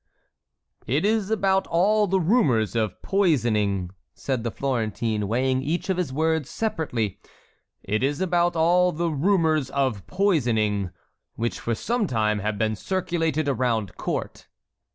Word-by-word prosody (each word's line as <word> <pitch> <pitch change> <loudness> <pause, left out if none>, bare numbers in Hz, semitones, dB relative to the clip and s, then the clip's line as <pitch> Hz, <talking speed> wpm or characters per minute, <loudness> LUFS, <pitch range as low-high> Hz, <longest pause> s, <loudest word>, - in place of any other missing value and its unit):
"It 145 - +1
is 215 -2 +1
about 195 -3 +1
all 205 +5 +3
the 190 +1 +2
rumors 155 - +2
of 110 -4 -1
poisoning," 110 - +1 0.2
said 130 -4 -2
the 120 - -1
Florentine, 110 -4 -2
weighing 130 +4 +1
each 165 +7 -1
of 185 - -1
his 175 -7 -1
words 160 +1 0
separately, 145 - -2 0.6
"it 105 +2 -1
is 140 +3 0
about 175 -2 +1
all 175 +2 +3
the 170 +1 -1
rumors 155 -3 +2
of 130 -10 -1
poisoning 115 - +1 0.5
which 115 +1 -2
for 115 - -2
some 230 - -1
time 105 -4 0
have 105 +1 -2
been 110 0 0
circulated 165 - -1
around 120 -7 0
court." - - -4
140 Hz, 135 wpm, -24 LUFS, 110-180 Hz, 0.6 s, all